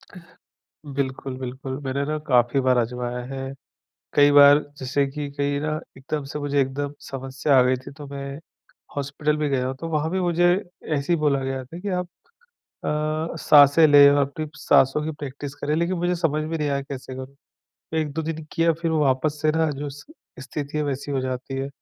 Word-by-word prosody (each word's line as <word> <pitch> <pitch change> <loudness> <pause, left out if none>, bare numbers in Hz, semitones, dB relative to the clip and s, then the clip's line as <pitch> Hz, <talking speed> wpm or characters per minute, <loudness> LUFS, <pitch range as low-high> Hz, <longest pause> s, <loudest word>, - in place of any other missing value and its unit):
अह। 180 - -10 0.7
बिल्कुल, 130 -1 -3
बिल्कुल। 130 +1 -5
मैंने 135 +1 -1
ना 155 +1 -2
काफ़ी 125 0 +3
बार 130 -1 +4
आज़माया 125 +1 -2
है। 135 0 -5 0.6
कई 145 0 +6
बार 145 0 +8 0.2
जैसे 135 +1 0
कि 145 +1 -5
कहीं 140 0 -1
ना 155 0 -1 0.2
एकदम 145 +2 -4
से 150 - -3
मुझे 145 -1 0
एकदम 140 +2 -2
समस्या 135 +1 0
आ - - +7
गई 130 +1 +3
थी 130 +2 -11
तो 145 -1 -8
मैं, 140 0 -6 0.6
हॉस्पिटल 145 +2 -1
भी 150 -1 0
गया 130 -2 0
हूँ, 130 - -3
तो 165 +5 -6
वहाँ 155 0 0
भी 190 - 0
मुझे 175 0 +3 0.4
ऐसे 140 +4 0
ही - - +2
बोला 140 -3 +1
गया 135 0 -3
था 165 +7 -10
कि 200 +2 -4
आप 180 - -4 0.8
अ, 155 +2 -1
साँसें 145 +2 +7
लें 145 -1 +9
अपनी 145 +2 0
साँसों 135 +3 +3
की 160 - -2
प्रैक्टिस 140 0 -6
करें 145 +1 -2
लेकिन 170 +3 0
मुझे 175 +1 +1
समझ 160 -3 0
में 165 +1 -3
नहीं 150 -1 0
आया 140 -1 0
कैसे 135 -1 -7
करूँ। 130 +1 -8 0.7
1-2 155 0 -2
दिन 160 0 -4
किया 165 0 +3
फिर 165 - 0
वापस 150 0 +1
से 155 0 +3
ना 160 0 +1
जो 145 +1 -5
स्थिति 145 - -8
है 150 - +1
वैसी 140 0 -3
हो 135 - 0
जाती 130 +1 -4
है 135 0 -2
145 Hz, 195 wpm, -24 LUFS, 135-155 Hz, 0.8 s, लें